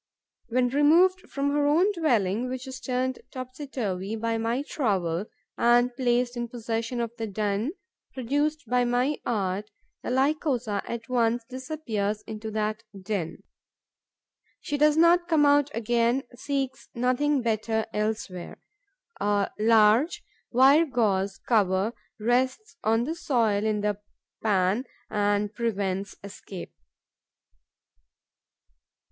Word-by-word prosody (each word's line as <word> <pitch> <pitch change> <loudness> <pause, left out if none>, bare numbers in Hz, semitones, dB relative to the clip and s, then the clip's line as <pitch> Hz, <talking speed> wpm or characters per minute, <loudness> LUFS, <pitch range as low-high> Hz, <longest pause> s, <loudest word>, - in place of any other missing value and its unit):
When 245 +1 +2
removed 335 +7 +4
from 280 0 -1
her 290 0 +2
own 345 +8 +4
dwelling, 245 - +1
which 255 0 -5
is 260 -1 -7
turned 255 0 -2
topsy 255 +2 -7
turvy 205 -5 -3
by 225 0 -1
my 230 +4 -1
trowel, 195 - -1 0.3
and 240 +1 +4
placed 245 -1 +1
in 240 0 -3
possession 230 +1 -3
of 230 -1 -2
the 225 - -2
den 210 - -1 0.4
produced 290 +4 -1
by 250 +2 +2
my 245 +4 +1
art, 205 -2 -1 0.3
the - - -5
Lycosa 260 -5 +1
at 235 -1 -5
once 240 -2 +1
disappears 250 -6 -3
into 220 0 -6
that 215 +1 -2 0.2
den. 185 -4 -4 1.2
She 290 - -3
does 300 +1 +4
not 345 +1 +5
come 315 -4 +4
out 285 0 +4
again, 235 +3 +1
seeks 270 0 -3
nothing 255 +3 +1
better 220 -1 0
elsewhere. 210 -4 -3 0.6
A 205 -1 +1
large 225 +7 +4 0.3
wire 275 +6 +6
gauze 200 -7 0
cover 205 -1 +1 0.3
rests 260 - 0
on 225 +2 +2
the 305 +6 -2
soil 230 -11 +1
in 215 -1 0
the 210 -1 -1 0.4
pan 205 +3 +1 0.3
and 205 0 +1
prevents 200 -4 -2
escape. 195 -2 -9
235 Hz, 120 wpm, -26 LUFS, 210-270 Hz, 1.2 s, wire